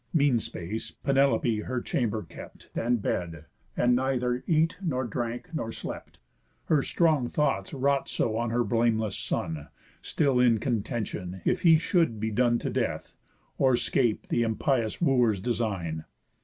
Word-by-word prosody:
Mean 140 -6 +4
space, 105 +1 -5
Penelope 135 -4 +1
her 125 +4 -3
chamber 110 -4 -1
kept 80 - -12
And 120 -2 0
bed, 85 -3 -3 0.3
and 125 0 +4
neither 125 -1 0
eat, 165 +1 +2
nor 135 -9 -1
drank, 120 - -4
nor 115 -8 -3
slept, - - -7 0.5
Her 155 -3 +3
strong 155 -5 +2
thoughts 135 -10 0
wrought 140 0 0
so 110 - 0
on 120 +1 -1
her 120 +1 +1
blameless 115 -2 +1
son, 80 -3 -3 0.3
Still 140 -5 +1
in 120 -2 +5
contention, 105 -6 -3
if - - +1
he 165 -2 +7
should 160 - +1
be 110 +1 -1
done 120 +2 +3
To - - -3
death, - - -2 0.5
or 130 -2 +4
'scape 120 -4 0
the 120 - +1
impious 115 +1 0
Wooers' 125 - +3
design. 100 -8 -2
120 Hz, 145 wpm, -27 LUFS, 110-135 Hz, 0.5 s, he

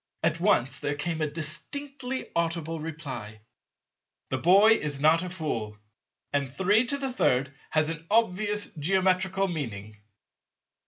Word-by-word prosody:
At 165 0 +1
once 135 -9 +2
there 145 - -2
came 160 +2 -2
a 155 - 0
distinctly 250 - -5
audible 165 -1 -1
reply, 130 -10 -7 0.9
"The 130 - 0
boy 195 - +6
is 150 -10 +1
not 155 +3 +4
a 180 - -4
fool; 120 -12 -3 0.6
and 140 -2 0
33 225 - +2 0.2
has 155 0 +2
an 165 0 -6
obvious 210 -1 +1
Geometrical 190 +3 +2
meaning." 110 - -5
165 Hz, 115 wpm, -27 LUFS, 145-195 Hz, 0.9 s, boy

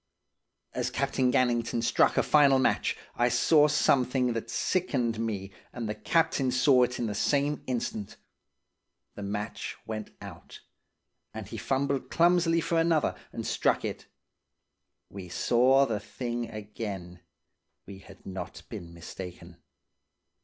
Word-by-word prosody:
"As 125 -1 -1
Captain 130 -1 0
Gannington 120 -2 +1
struck - - +3
a - - +4
final 140 -3 +5
match, 130 - +1 0.2
I 120 +1 +2
saw 150 +5 +4
something 125 -3 +2
that 115 - -4
sickened 125 -11 0
me 100 -4 -3 0.2
and 120 -3 -5
the 105 - -2
captain 155 -1 +1
saw 130 +1 +4
it 125 0 +1
in 120 - -2
the 105 - -2
same 145 +7 +1
instant. 115 -5 -3 1.0
The - - -9
match 105 +1 -4
went 110 -1 -5
out, - - -11 0.7
and 110 -2 -5
he 115 - -7
fumbled 135 +4 -1
clumsily 170 -1 +3
for 165 0 +1
another, 165 -2 +2 0.2
and - - -5
struck - - +1
it. - - -5 1.0
We 95 -3 -9
saw 125 +9 +4
the 110 -5 -2
thing 120 +2 -4
again. 105 -5 -7 0.7
We 95 -1 -10
had 95 0 -16
not 95 -2 -7
been 85 0 -8
mistaken. 85 0 -9
120 Hz, 130 wpm, -28 LUFS, 105-135 Hz, 1.0 s, final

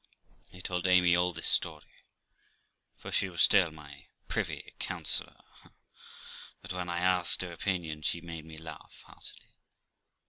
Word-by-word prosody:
I 90 - -11
told 90 0 -2
Amy 90 -1 +5
all 90 +1 +2
this 85 -1 -6
story, - - 0 0.9
for - - -9
she 95 - +1
was 85 - +3
still 95 -4 +6
my 75 -3 -14 0.2
privy - - -3
councillor; - - +1 1.2
but - - -5
when 90 -1 -4
I 85 - -2
asked 90 0 +2
her 90 - -6
opinion, 85 -3 -3
she 85 - 0
made 85 -2 -8
me 80 -1 -11
laugh 80 0 -11
heartily. - - -14
85 Hz, 140 wpm, -30 LUFS, 80-90 Hz, 1.2 s, still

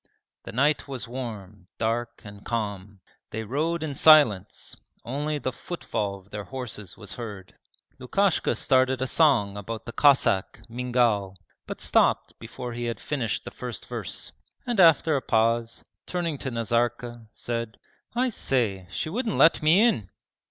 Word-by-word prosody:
The - - -6
night 145 +6 +1
was 130 -4 -5
warm, 105 -6 -7
dark, 115 +2 -2
and 100 0 -10
calm. 100 -4 -4 0.3
They 110 +1 -4
rode 160 +8 -1
in 150 -3 -3
silence, 140 - +4 0.3
only 145 +5 -2
the 130 -2 -2
footfall 110 - -4
of 95 +1 -20
their 105 -1 -5
horses 120 -8 -7
was 105 -3 -8
heard. 105 -6 -8 0.5
Lukashka 190 +8 +1
started 130 -1 +2
a 130 - 0
song 120 -9 +3
about 110 +2 -6
the 120 - -6
Cossack, 125 -8 +3
Mingal, 120 -5 0 0.3
but - - -6
stopped - - +2
before 125 -1 -7
he 120 +1 -4
had 115 -1 -3
finished 125 -8 -2
the - - -6
first 120 -6 -6
verse, - - -5 0.3
and 240 -4 -1
after 165 -3 +6
a 135 - 0
pause, 115 0 0 0.2
turning 170 -5 -2
to 135 - -3
Nazarka, 120 0 -1
said: 115 -2 -4 0.4
'I 255 +2 +2
say, 110 - -1
she 90 - -3
wouldn't 220 +6 -2
let 165 - +5
me 165 +7 +5
in!' 110 - -1
120 Hz, 150 wpm, -26 LUFS, 105-145 Hz, 0.5 s, after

